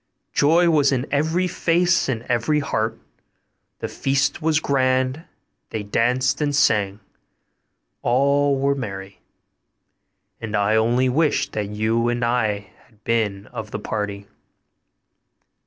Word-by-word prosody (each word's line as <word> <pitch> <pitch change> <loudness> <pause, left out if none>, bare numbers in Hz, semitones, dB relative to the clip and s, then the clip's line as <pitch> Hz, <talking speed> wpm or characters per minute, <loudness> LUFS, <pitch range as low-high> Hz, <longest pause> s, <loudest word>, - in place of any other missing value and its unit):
Joy 165 +4 +4
was 150 -4 +3
in 130 -1 0
every 160 +5 +1
face 175 -2 +1
and 115 -3 -2
every 125 +6 +1
heart. 115 -5 -2 0.8
The - - -2
feast 135 +2 0
was 160 0 +2
grand; 130 +1 0 0.4
they 110 -2 -4
danced 125 +6 +1
and 145 -1 0
sang; 105 -7 +2 1.0
all 140 +3 +2
were 140 +1 +1
merry; 100 -7 -7 1.2
and 110 -2 -4
I 105 +1 +2
only 120 +4 +2
wish 150 +4 +1
that 105 -2 -3
you 110 +3 0
and 120 0 0
I 110 -5 -1 0.2
had 110 -2 -29
been 105 -4 -1
of 110 -3 -6
the - - -4
party. 105 -1 -4
125 Hz, 125 wpm, -22 LUFS, 110-140 Hz, 1.2 s, Joy